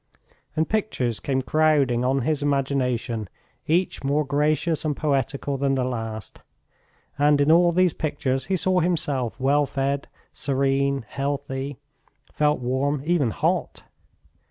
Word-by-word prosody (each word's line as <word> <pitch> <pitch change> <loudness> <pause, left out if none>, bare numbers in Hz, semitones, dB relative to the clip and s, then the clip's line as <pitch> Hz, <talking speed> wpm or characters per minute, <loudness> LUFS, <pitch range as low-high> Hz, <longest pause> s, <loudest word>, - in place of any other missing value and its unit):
And 160 +1 +1
pictures 165 - -1
came 130 -1 -1
crowding 145 -6 +2
on 130 0 +1
his 150 +1 0
imagination, 130 -6 -1 0.4
each 175 +1 +1
more 145 +2 +1
gracious 150 +3 +1
and 150 -3 -1
poetical 140 -1 -1
than 135 0 +1
the 130 - 0
last. 115 -4 -5 0.8
And 145 0 +4
in 145 +2 +4
all 175 +1 +5
these 180 0 +3
pictures 135 -3 -2
he 190 0 +1
saw 185 +1 +2
himself 145 -9 -1
well 140 +2 +2
fed, 140 +1 -2 0.3
serene, 140 -1 0
healthy, 135 -1 -3 0.6
felt 150 -2 +1
warm, 135 +3 0
even 160 -7 +2
hot! - - -1
140 Hz, 130 wpm, -24 LUFS, 130-150 Hz, 0.8 s, all